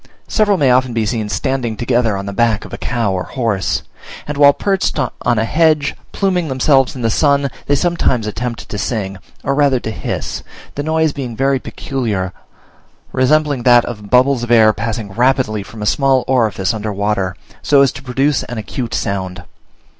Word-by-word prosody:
Several 205 -3 +2
may 135 -6 +3
often 130 -1 +2
be 115 -1 0
seen 110 -1 -2
standing 120 +3 -2
together 120 -3 +1
on 100 - -5
the 100 - -5
back 115 0 +1
of - - -11
a - - -4
cow 115 -5 -1
or 90 - -1
horse; 110 -4 -1 0.4
and 150 - -3
while 140 0 +7
perched 195 +4 -1
on 145 -4 0 0.3
a 110 - +1
hedge, 155 +1 +2 0.2
pluming 185 -4 0
themselves 135 0 +2
in 125 - -6
the 115 - +2
sun, 140 +1 +2 0.2
they 145 - +3
sometimes 140 -7 +1
attempt 115 +2 -4
to 105 - -5
sing, 100 -5 -3 0.2
or 140 - 0
rather 140 -2 +3
to 110 - -5
hiss; - - -4 0.3
the 145 - -3
noise 160 0 +1
being 125 -5 -5
very 135 +2 +1
peculiar, 105 -10 -3 0.8
resembling 145 +1 +2
that 120 0 +5
of 105 -4 -7
bubbles 130 +1 +4
of 120 - -4
air 110 -2 +6
passing 115 -2 -4
rapidly 120 -1 +1
from 105 +2 -9
a - - -2
small 135 +2 +2
orifice 110 -5 +1
under 110 -1 -3
water, 100 -2 -1 0.3
so 140 -1 +4
as 135 - +2
to - - -10
produce 135 +2 0
an 120 - -6
acute 115 +2 -4
sound. 95 -1 -3
125 Hz, 185 wpm, -17 LUFS, 110-140 Hz, 0.8 s, while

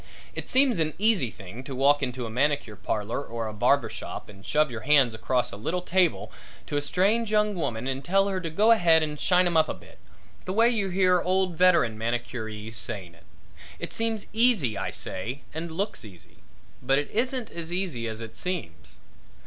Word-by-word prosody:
It - - -6
seems 260 -7 +3
an 155 -1 0
easy 210 - +2
thing 105 +4 -10
to 135 - -6
walk 140 +2 +4
into 125 -2 -3
a - - -5
manicure 140 -3 0
parlor 105 +5 -3
or 115 -2 -5
a 110 - -4
barber 105 - +3
shop - - -7
and 95 -1 -14
shove 150 +5 +1
your 115 - -5
hands 135 -2 +4
across 120 +3 0
a - - -7
little 165 - -2
table 180 -1 +1 0.3
to 145 - -5
a 145 - +2
strange 205 +9 +1
young 210 -1 +2
woman 130 - -3
and 135 +1 -3
tell 195 +2 +2
her 190 -2 -2
to 165 - -3
go 210 +8 +4
ahead 170 -7 +5
and 150 -1 -4
shine 180 0 +3
'em 175 -1 0
up 160 - +4
a - - -2
bit - - -17 0.5
the 185 - -3
way 230 +3 +5
you 210 -5 0
hear 185 -1 +3
old 185 -1 +1
veteran 170 -11 +4
manicurees 115 -2 -4
saying 95 -7 -4
it. 85 - -21 0.5
It - - -6
seems 225 -2 -1
easy, 220 - +3
I 95 - -2
say, 120 +9 -5
and 165 +2 -4
looks 200 +6 -3
easy; 90 - -14 0.4
but 135 +2 +2
it 145 - -2
isn't 250 +1 -1
as 170 0 -5
easy 175 -11 -1
as 110 0 -5
it 110 -1 -8
seems. 115 - -5
150 Hz, 200 wpm, -26 LUFS, 115-185 Hz, 0.5 s, ahead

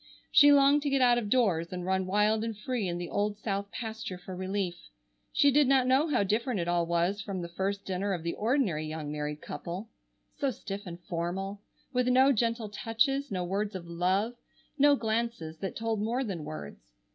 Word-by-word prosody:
She 290 -1 +8
longed 285 +1 +6
to 285 - -1
get 275 -1 +2
out 240 -1 +5
of 210 -4 -4
doors 190 -9 +2
and 180 -1 -4
run 190 0 0
wild 210 +3 +2
and 225 -2 -4
free 220 -1 -2
in 175 0 -2
the 175 0 -4
old 205 +2 -1
south 200 -2 -3
pasture 220 -5 -5
for 180 +1 -8
relief. 185 0 -2 0.6
She 285 - +4
did 290 0 +4
not 265 -1 +4
know 265 +5 +3
how 290 -9 +2
different 220 +3 0
it 170 - -2
all 175 -1 +1
was 170 +4 +1
from 200 -2 -4
the - - -4
first 195 +3 -3
dinner 195 +2 -2
of 175 -4 -2
the 170 - -2
ordinary 210 - 0
young 155 -1 -5
married 150 0 -4
couple; 175 +8 -6 0.5
so 280 - +1
stiff 200 -4 -6
and 170 0 -7
formal, 185 +4 -3 0.3
with 250 0 +1
no 260 +2 +5
gentle 230 -2 0
touches, 270 +7 0
no 185 -2 -2
words 200 +3 -2
of 180 -2 -6
love, 185 +7 0 0.4
no 290 0 +5
glances 225 - -2
that 195 - -4
told 225 -2 -1
more 235 +5 0
than 180 - -4
words. 70 -6 -9
205 Hz, 200 wpm, -29 LUFS, 175-240 Hz, 0.6 s, She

